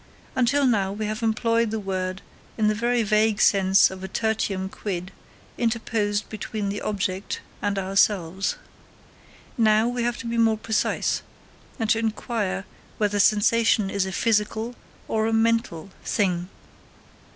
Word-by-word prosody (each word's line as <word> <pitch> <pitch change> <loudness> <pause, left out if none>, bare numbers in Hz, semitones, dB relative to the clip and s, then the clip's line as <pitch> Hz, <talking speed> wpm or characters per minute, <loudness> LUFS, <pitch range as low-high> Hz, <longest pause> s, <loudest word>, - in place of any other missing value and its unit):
Until 265 +3 +3
now 200 -6 +2
we 215 +2 -3
have 215 +2 -3
employed 230 +1 +1
the 220 +1 -2
word 185 -1 -3 0.3
in 215 -2 +2
the - - +2
very 235 +2 +1
vague 215 0 +2
sense 195 -1 +5
of 190 0 -8
a - - -3
tertium 200 -2 -1
quid 190 -2 -5 0.5
interposed 220 -3 0
between 215 -1 -4
the 205 +1 -3
object 195 -2 -2 0.2
and 205 -1 -1
ourselves. 195 -1 +1 1.0
Now 215 0 +4
we 245 0 -2
have 240 0 -1
to - - -8
be 230 0 -1
more 225 -1 +3
precise, 220 0 0 0.6
and 225 -4 -1
to 225 - +3
inquire 215 -3 -2 0.3
whether 205 -1 +1
sensation 215 0 +3
is 200 -1 0
a - - -4
physical 220 +3 0 0.3
or 220 0 0
a 225 - 0
mental 225 -6 +1
thing. 180 -4 0
215 Hz, 140 wpm, -24 LUFS, 195-225 Hz, 1.0 s, sense